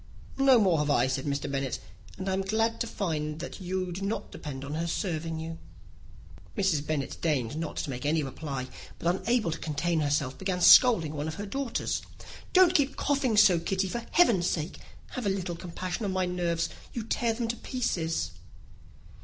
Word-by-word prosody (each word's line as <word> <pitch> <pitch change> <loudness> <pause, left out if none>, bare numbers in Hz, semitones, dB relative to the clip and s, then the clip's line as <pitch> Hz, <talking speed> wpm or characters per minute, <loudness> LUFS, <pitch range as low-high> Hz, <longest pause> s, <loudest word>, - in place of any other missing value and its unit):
"No 270 -2 +7
more 185 -7 +3
have 150 0 0
I," 145 - +4
said 130 0 -2
Mr. 140 -1 -1
Bennet; 135 -2 -2 0.4
"and 190 0 -5
I 190 - +1
am 190 - +1
glad 225 +4 0
to 235 - 0
find 155 -7 -2
that 175 - -7
you 185 0 -2
do 180 +3 -5
not 200 +3 -3
depend 140 -2 -7
on 140 - -5
her 165 +2 -1
serving 165 -2 -2
you." 165 +1 -6 1.0
Mrs. 175 -7 +1
Bennet 145 -4 -2
deigned 145 -6 0
not 160 0 -4
to - - -2
make 125 -1 -5
any 155 +1 +1
reply; 135 -1 -5 0.3
but, 175 +2 +1
unable 225 -2 +1
to 160 - -4
contain 160 +2 -1
herself, 145 -3 0
began 190 -1 -1
scolding 175 - +7
one 150 0 -3
of 160 - -4
her 205 - -5
daughters. 265 +3 -2 0.5
"Don't 365 -2 +6
keep 285 -5 +2
coughing 270 -6 +1
so, 200 -5 +7
Kitty, 190 +3 -1
for 235 +4 -3
heaven's 220 - +4
sake! 160 0 -2 0.3
Have 250 -5 -3
a - - +3
little 185 -3 -2
compassion 180 +4 -5
on 200 - -1
my 185 0 +1
nerves. 170 -2 -1 0.2
You 235 - -3
tear 230 +1 0
them 230 0 -2
to 235 - -1
pieces." 165 - -2
175 Hz, 190 wpm, -28 LUFS, 155-210 Hz, 1.0 s, No